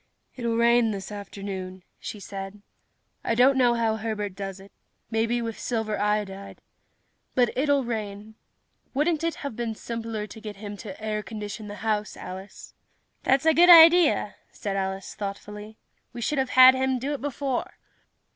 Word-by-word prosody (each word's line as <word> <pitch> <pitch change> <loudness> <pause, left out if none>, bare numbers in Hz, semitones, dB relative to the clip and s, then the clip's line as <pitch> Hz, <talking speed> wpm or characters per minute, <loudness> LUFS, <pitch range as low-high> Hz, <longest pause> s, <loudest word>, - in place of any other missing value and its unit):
"It'll 235 -2 -1
rain 235 0 +4
this 195 -2 -5
afternoon," 195 -2 -7 0.2
she 210 - -7
said. 195 +1 -8 0.6
"I 230 - 0
don't 255 +3 +5
know 245 -2 +4
how 225 -2 +1
Herbert 210 -2 -3
does 195 -1 -6
it 195 +1 -15 0.4
maybe 230 +2 0
with 225 -1 -5
silver 220 -3 -2
iodide. 205 -2 -2 0.8
But 245 -2 +2
it'll 280 0 +2
rain. 215 -2 -5 0.6
Wouldn't 310 +3 +1
it 335 0 0
have 280 - -4
been 230 -1 -3
simpler 225 -2 -5
to 220 +1 -11
get 210 -1 -7
him 205 +1 -7
to 195 -2 -9
air 215 -1 -2
condition 210 +1 -7
the 205 - -7
house, 210 -1 -1
Alice?" 190 +2 -9 0.5
"That's 270 +3 +2
a 320 - +6
good 350 +2 +6
idea," 335 -1 +7
said 200 -3 -4
Alice 190 0 -3
thoughtfully. 210 +1 -7 0.4
"We 240 - -7
should 280 +4 0
have 265 -1 0
had 255 0 +10
him 260 0 0
do 270 +4 -3
it 285 - -5
before." 275 -2 -3
220 Hz, 160 wpm, -26 LUFS, 205-250 Hz, 0.8 s, had